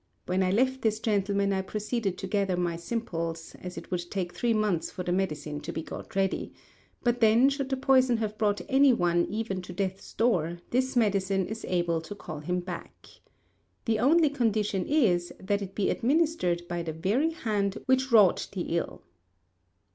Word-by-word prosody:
When 185 Hz, +1 st, 0 dB
I 185 Hz, -, +2 dB
left 260 Hz, +6 st, +1 dB
this 215 Hz, -1 st, +1 dB
gentleman 200 Hz, -2 st, +1 dB
I 190 Hz, -, 0 dB
proceeded 210 Hz, 0 st, -2 dB
to -, -, -5 dB
gather 195 Hz, -2 st, 0 dB
my 175 Hz, -1 st, 0 dB
simples, 170 Hz, -4 st, -4 dB
as 180 Hz, 0 st, -7 dB
it -, -, -9 dB
would 175 Hz, -1 st, -3 dB
take 180 Hz, -3 st, -3 dB
three 240 Hz, -, 0 dB
months 210 Hz, -6 st, +1 dB
for 180 Hz, -, -6 dB
the 175 Hz, -, -2 dB
medicine 155 Hz, -5 st, -2 dB
to -, -, -5 dB
be 160 Hz, -, -4 dB
got -, -, -9 dB
ready; 195 Hz, 0 st, 0 dB, 0.5 s
but 240 Hz, 0 st, +1 dB
then, 230 Hz, +4 st, +6 dB
should 275 Hz, -1 st, -3 dB
the 265 Hz, -, 0 dB
poison 260 Hz, -2 st, +4 dB
have 215 Hz, -1 st, -2 dB
brought 205 Hz, -1 st, +1 dB
anyone 230 Hz, -11 st, +4 dB
even 210 Hz, -3 st, -3 dB
to 180 Hz, -, -9 dB
death's 190 Hz, +1 st, -4 dB
door, 175 Hz, -8 st, +1 dB
this 260 Hz, +2 st, +1 dB
medicine 195 Hz, -4 st, +2 dB
is 220 Hz, +3 st, -6 dB
able 175 Hz, -2 st, 0 dB
to 205 Hz, +5 st, -8 dB
call 155 Hz, -6 st, -7 dB
him 180 Hz, +4 st, -2 dB
back. 175 Hz, -1 st, -9 dB, 0.8 s
The 225 Hz, -2 st, +1 dB
only 305 Hz, +5 st, +4 dB
condition 215 Hz, -7 st, 0 dB
is 190 Hz, -, +2 dB
that 200 Hz, +2 st, -1 dB
it 195 Hz, -1 st, -7 dB
be 205 Hz, -, +1 dB
administered 255 Hz, -, +1 dB
by 175 Hz, -1 st, -3 dB
the 165 Hz, -1 st, -4 dB
very 210 Hz, -, +1 dB
hand 210 Hz, -, -1 dB
which 260 Hz, 0 st, +2 dB
wrought 210 Hz, -6 st, +5 dB
the 175 Hz, -3 st, -2 dB
ill." -, -, -4 dB
200 Hz, 180 wpm, -28 LUFS, 180-235 Hz, 0.8 s, then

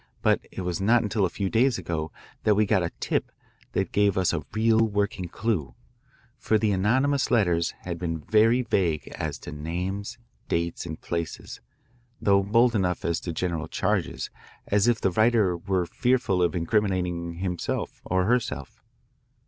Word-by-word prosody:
But -, -, +3 dB
it -, -, -5 dB
was 90 Hz, +1 st, -2 dB
not 115 Hz, +4 st, +4 dB
until 105 Hz, -1 st, +1 dB
a -, -, 0 dB
few 100 Hz, +3 st, -2 dB
days 115 Hz, +4 st, +2 dB
ago 80 Hz, -2 st, -3 dB, 0.3 s
that 105 Hz, -, +4 dB
we 105 Hz, +1 st, +3 dB
got 100 Hz, -1 st, +2 dB
a 85 Hz, -, -1 dB
tip -, -, -1 dB, 0.4 s
that -, -, -1 dB
gave 100 Hz, -2 st, +2 dB
us 95 Hz, -2 st, +2 dB
a 80 Hz, -, -1 dB
real 110 Hz, +1 st, +3 dB
working 100 Hz, -4 st, 0 dB
clue, 85 Hz, -, -2 dB, 0.6 s
for 110 Hz, -, +2 dB
the 110 Hz, -1 st, +1 dB
anonymous 130 Hz, +9 st, +2 dB
letters 90 Hz, -8 st, +2 dB
had 85 Hz, -2 st, -5 dB
been 80 Hz, -2 st, -2 dB
very 110 Hz, +9 st, +3 dB
vague 85 Hz, -, 0 dB
as -, -, -4 dB
to -, -, -8 dB
names, 90 Hz, +7 st, -4 dB, 0.3 s
dates, 85 Hz, 0 st, -1 dB
and 80 Hz, -, -6 dB
places, 85 Hz, -1 st, -5 dB, 0.6 s
though 100 Hz, -1 st, +4 dB
bold 115 Hz, +5 st, +3 dB
enough 90 Hz, -5 st, 0 dB
as 85 Hz, -, 0 dB
to 85 Hz, -, -5 dB
general 85 Hz, -1 st, -2 dB
charges, -, -, -1 dB, 0.3 s
as 100 Hz, +2 st, +2 dB
if 120 Hz, -3 st, +3 dB
the 95 Hz, -, +1 dB
writer 110 Hz, -2 st, +3 dB
were 90 Hz, +1 st, -1 dB
fearful 125 Hz, -4 st, +1 dB
of 90 Hz, +1 st, +1 dB
incriminating 90 Hz, -2 st, 0 dB
herself 90 Hz, -1 st, -3 dB
or 95 Hz, +1 st, 0 dB
himself. 120 Hz, +1 st, -1 dB
95 Hz, 165 wpm, -26 LUFS, 85-110 Hz, 0.6 s, not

